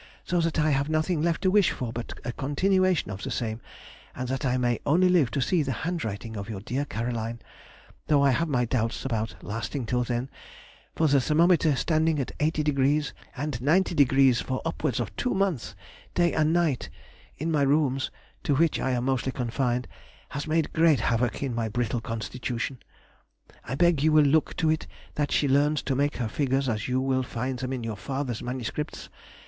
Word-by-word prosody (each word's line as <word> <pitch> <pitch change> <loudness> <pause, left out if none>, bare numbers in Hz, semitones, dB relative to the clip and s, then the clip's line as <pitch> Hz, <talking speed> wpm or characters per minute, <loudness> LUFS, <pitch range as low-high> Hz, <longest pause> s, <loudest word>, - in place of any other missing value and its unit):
so 175 -1 0
that 165 0 0
I 155 0 +3
have 140 +1 +1
nothing 155 +1 +1
left 170 +3 0
to 185 - +3
wish 205 -2 +5
for 120 -3 -4
but 120 0 -5
a - - -1
continuation 180 - +1
of 95 +1 -6
the - - -4
same, 115 -1 -3 0.5
and 125 0 -4
that 135 +2 -2
I 125 0 +1
may 120 -1 +1
only 180 +5 +4
live 170 -9 +4
to 140 - -1
see 175 +3 +2
the 140 -2 -1
handwriting 115 - -3
of 100 +1 -6
your 105 -3 -4
dear 125 +8 -2
Caroline, 115 -2 -3 0.7
though 145 -2 +4
I 140 - +5
have 150 +7 +1
my 125 -4 +2
doubts 115 0 -1
about 115 -4 -2
lasting 115 +5 -4
till 125 +2 0
then, 120 +2 -3 0.6
for 160 - +2
the 140 -2 +4
thermometer 160 +1 +3
standing 160 +4 +1
80° 150 0 0 0.2
and 145 -2 -3
90° 140 -4 +4
for 130 0 -3
upwards 155 -6 -1
of 110 -4 -4
two 250 - 0
months, 185 - -1 0.4
day 175 -1 +3
and 155 0 +2
night, 165 -6 +1 0.5
in 160 +3 -2
my 150 -2 +2
rooms 140 -1 +2 0.3
(to 145 - +1
which 165 +2 +2
I 130 - 0
am 125 0 -1
mostly 130 0 0
confined) 125 0 -1 0.4
has 145 +2 -5
made 155 0 0
great 160 -6 +4
havoc 120 +3 0
in 135 -3 -2
my 115 -1 -1
brittle 120 +1 -1
constitution. 120 +3 -4 0.8
I 130 - -4
beg 170 -1 +3
you 155 +2 +4
will 155 -1 +6
look 155 +2 +2
to 160 -2 +2
it 155 - -2 0.3
that 145 -1 -1
she 145 - +2
learns 145 +2 +2
to 135 - -1
make 145 +2 0
her 120 - -1
figures 135 +3 0
as 110 -3 -1
you 130 0 +1
will 130 0 +1
find 125 +1 -3
them 130 0 -3
in 130 -3 -3
your 110 -2 -4
father's 130 +3 -3
MSS. 130 +5 -4
135 Hz, 190 wpm, -27 LUFS, 120-155 Hz, 0.8 s, will